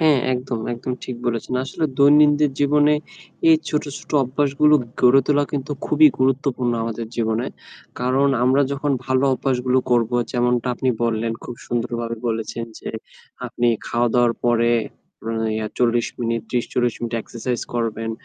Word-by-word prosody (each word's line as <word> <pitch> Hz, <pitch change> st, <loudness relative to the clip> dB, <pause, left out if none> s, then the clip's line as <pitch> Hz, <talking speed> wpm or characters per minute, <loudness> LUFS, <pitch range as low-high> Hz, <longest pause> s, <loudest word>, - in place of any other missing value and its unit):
হ্যাঁ, 155 Hz, -3 st, +4 dB, 0.2 s
একদম, 125 Hz, -1 st, -3 dB, 0.2 s
একদম 125 Hz, +2 st, -5 dB
ঠিক 125 Hz, -, -6 dB
বলেছেন। 120 Hz, +1 st, -2 dB
আসলে 135 Hz, +4 st, -3 dB
দৈনন্দিন 145 Hz, +1 st, +5 dB
জীবনে 150 Hz, +1 st, +4 dB, 0.5 s
এই 160 Hz, -, +7 dB
ছোট, 150 Hz, -, 0 dB, 0.2 s
ছোট -, -, -16 dB
অভ্যাসগুলো 140 Hz, +3 st, +2 dB, 0.3 s
গড়ে 130 Hz, +2 st, +6 dB
তোলা 145 Hz, -1 st, +3 dB
কিন্তু 145 Hz, +1 st, -3 dB
খুবই 155 Hz, 0 st, +6 dB
গুরুত্বপূর্ণ 130 Hz, -2 st, +1 dB
আমাদের 115 Hz, 0 st, -4 dB
জীবনে। 115 Hz, +1 st, 0 dB, 0.5 s
কারণ 130 Hz, +3 st, +2 dB, 0.2 s
আমরা 130 Hz, +3 st, +4 dB
যখন 140 Hz, +1 st, -1 dB
ভালো 130 Hz, +1 st, +2 dB
অভ্যাসগুলো 130 Hz, -1 st, 0 dB
করব 120 Hz, -2 st, +2 dB, 0.2 s
যেমনটা 125 Hz, -1 st, +1 dB
আপনি 130 Hz, -, -2 dB, 0.2 s
বললেন, 115 Hz, 0 st, -1 dB
খুব 120 Hz, -, -6 dB
সুন্দরভাবে 120 Hz, -1 st, -3 dB
বলেছেন, 115 Hz, +1 st, -3 dB
যে -, -, -6 dB, 0.6 s
আপনি 120 Hz, 0 st, 0 dB, 0.2 s
খাওয়া-দাওয়ার 120 Hz, 0 st, +2 dB
পরে 120 Hz, -1 st, +3 dB, 0.6 s
অ্যা 115 Hz, 0 st, -2 dB, 0.2 s
ইয়া 110 Hz, 0 st, -2 dB
৪০ 120 Hz, -1 st, +2 dB
মিনিট, 115 Hz, -1 st, -1 dB
৩০-৪০ 120 Hz, -1 st, 0 dB
মিনিট 120 Hz, 0 st, -3 dB
Exercise 120 Hz, +1 st, -4 dB
করবেন। 115 Hz, -1 st, -2 dB
125 Hz, 140 wpm, -21 LUFS, 115-140 Hz, 0.6 s, এই